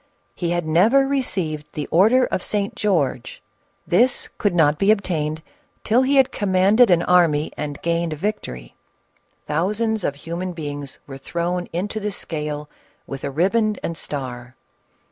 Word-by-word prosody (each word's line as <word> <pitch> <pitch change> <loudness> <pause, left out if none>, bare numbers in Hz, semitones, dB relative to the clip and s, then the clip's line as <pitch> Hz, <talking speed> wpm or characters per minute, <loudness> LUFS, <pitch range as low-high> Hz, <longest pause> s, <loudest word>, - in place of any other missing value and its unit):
He 175 - -3
had 175 -1 -1
never 215 +13 +4
received 180 - -2
the 150 - -3
order 225 +9 +5
of - - -2
St. 205 +1 -1
George; 160 - -1 0.5
this 245 +8 +2
could 205 -5 +1
not 150 -3 +3
be 195 - +2
obtained 160 -7 0 0.4
till 230 +4 +3
he 270 +1 +5
commanded 205 +1 +3
an 175 -1 +4
army 165 -4 +3
and 145 -2 -5
gained 170 -1 0
a - - -4
victory. 145 - -4 0.7
Thousands 210 +7 0
of 140 - -1
human 170 +5 -5
beings 145 -4 -6
were 135 -1 -9
thrown 175 +4 -3
into 200 +6 -3
the 210 0 -3
scale 150 -4 -4 0.4
with 135 0 -7
a 140 - -2
riband 205 +8 +1
and 170 - -3
star. 130 -5 -6
175 Hz, 145 wpm, -22 LUFS, 150-210 Hz, 0.7 s, order